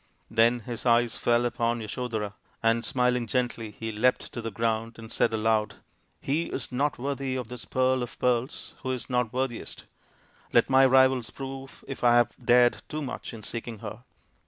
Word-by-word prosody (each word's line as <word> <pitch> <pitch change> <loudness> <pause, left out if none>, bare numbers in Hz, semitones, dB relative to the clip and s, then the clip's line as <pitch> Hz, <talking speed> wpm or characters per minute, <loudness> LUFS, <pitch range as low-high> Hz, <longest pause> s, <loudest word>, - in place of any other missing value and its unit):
Then 115 +2 +4
his 115 +1 -6
eyes 120 -1 +3
fell 120 0 +2
upon 120 0 0
Yasodhara, 110 -2 -3 0.3
and 115 +1 +3
smiling 125 -2 +1
gently 120 -2 -1
he 110 0 -3
leapt 120 +4 +1
to 120 - -4
the 115 - -3
ground 115 +1 -1
and 110 0 -10
said 115 - +2
aloud, 110 -1 +1 0.3
" - - -43
He 160 +5 +2
is - - -5
not 140 +3 0
worthy 135 0 -2
of 125 -3 -4
this 125 -1 -6
pearl 130 0 +1
of 120 +2 -6
pearls 125 +2 -1
who 130 - -4
is 125 0 -5
not 125 -2 +1
worthiest; 130 -2 -3 0.7
let - - +4
my 135 0 +7
rivals 130 -2 +4
prove 135 0 -8
if 135 - -6
I 120 -1 +6
have 120 -1 +3
dared 120 0 +5
too 155 0 -3
much 130 - -5
in 115 -3 -10
seeking 115 +1 -5
her." 105 +2 -7
120 Hz, 180 wpm, -27 LUFS, 115-130 Hz, 0.7 s, my